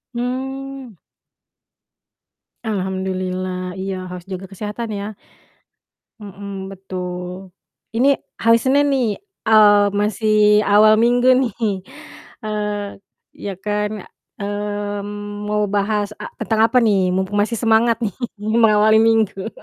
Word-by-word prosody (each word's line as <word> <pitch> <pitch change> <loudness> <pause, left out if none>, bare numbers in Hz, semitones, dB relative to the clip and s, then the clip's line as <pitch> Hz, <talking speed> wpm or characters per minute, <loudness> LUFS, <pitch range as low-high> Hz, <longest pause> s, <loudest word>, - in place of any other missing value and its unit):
Mmm. 265 0 -4 1.7
Alhamdulillah, 185 -2 -3
iya 190 -1 -4
harus 180 -1 -8
juga 190 0 -7
kesehatan 210 +4 -5
ya. 205 +1 -5 1.1
Mhm, 195 -1 -7
betul, 185 -1 -6 0.5
ini 275 +3 +5 0.2
hari 230 0 +4
Senin 280 +3 +3
nih, 240 -6 0 0.3
eee, 205 -2 +6
masih 210 0 +3
awal 215 +1 +5
minggu 245 +2 +4
nih. 250 -5 +1 0.9
Eee, 210 -1 -3 0.3
ya 200 - -6
kan, 210 0 -3 0.3
mmm, 205 0 -4
mau 210 0 +1
bahas 205 +1 0
a - - -6
tentang 220 -1 +1
apa 255 - +2
nih? 195 -4 +3
Mumpung 190 +2 -1
masih 225 +3 -1
semangat 230 0 +3
nih 200 - -3 0.2
mengawali 215 0 +4
minggu. 225 -3 +1
205 Hz, 105 wpm, -20 LUFS, 195-220 Hz, 1.7 s, eee